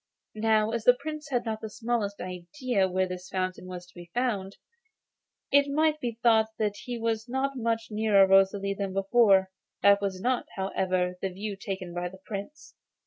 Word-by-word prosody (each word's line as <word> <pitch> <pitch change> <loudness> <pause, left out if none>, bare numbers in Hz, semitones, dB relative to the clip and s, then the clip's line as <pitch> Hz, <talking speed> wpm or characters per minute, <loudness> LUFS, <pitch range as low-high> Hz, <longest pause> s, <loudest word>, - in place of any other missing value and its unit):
Now, 220 0 +2
as 230 -1 -3
the 245 - +7
Prince 305 0 -6
had 245 -3 0
not 220 -1 -3
the 220 - -5
smallest 220 -2 -2
idea 190 +4 -1
where 185 0 0
this 180 0 -7
fountain 185 -1 -3
was 180 -1 -7
to 180 - -22
be 175 -1 -12
found, 205 -6 -1 0.9
it 285 0 +5
might 305 +1 +2
be 235 -5 -4
thought 220 -2 +5
that 210 -2 0
he 245 -1 -4
was 225 0 -2
not 270 +2 -1
much 230 -2 -1
nearer 210 -2 +5
Rosalie 195 +1 +3
than 195 -1 -4
before. 195 -1 +4 0.3
This 200 0 +7
was 195 -2 -2
not, 250 +5 0
however, 185 -1 -1
the 195 - -1
view 200 +3 -5
taken 190 -2 -5
by 175 0 -3
the 190 - -13
Prince. 200 +9 -8
205 Hz, 180 wpm, -28 LUFS, 190-235 Hz, 0.9 s, the